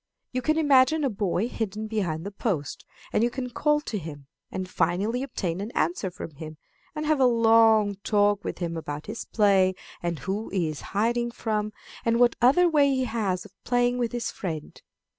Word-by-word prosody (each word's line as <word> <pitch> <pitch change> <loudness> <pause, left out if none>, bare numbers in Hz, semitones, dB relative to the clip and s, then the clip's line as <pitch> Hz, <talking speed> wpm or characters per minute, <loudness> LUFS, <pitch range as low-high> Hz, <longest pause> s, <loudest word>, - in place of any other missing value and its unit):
You 255 - -2
can 310 +5 +1
imagine 290 0 +4
a 270 - +1
boy 200 0 0
hidden 215 -3 -4
behind 190 -7 -2
the 200 - -4
post, 190 - -3 0.3
and 215 - +3
you 240 - +3
can 250 0 -5
call 295 +4 +2
to 220 -7 -4
him, 145 -4 -9 0.2
and 185 0 -4
finally 185 +8 0
obtain 190 -9 -3
an 205 - -4
answer 175 +4 0
from 175 -3 -8
him, 155 0 -8 0.4
and 305 0 -3
have 305 -1 +2
a 260 - +5
long 225 -3 +5
talk 205 -1 +2
with - - -4
him 170 -2 -3
about 150 -2 -5
his 220 +2 -6
play 195 -3 +3 0.3
and 170 -1 -2
who 195 +7 -4
he 180 -4 0
is 155 - -6 0.2
hiding 235 +3 +1
from, 215 -2 -2 0.3
and 230 0 +2
what 245 -1 +4
other 280 +9 +5
way 295 -4 +4
he 260 -1 +1
has 210 -6 -1
of - - -13
playing 245 0 +1
with 235 -2 0
his 240 -1 -3
friend. 160 -5 -6
215 Hz, 195 wpm, -26 LUFS, 185-245 Hz, 0.4 s, a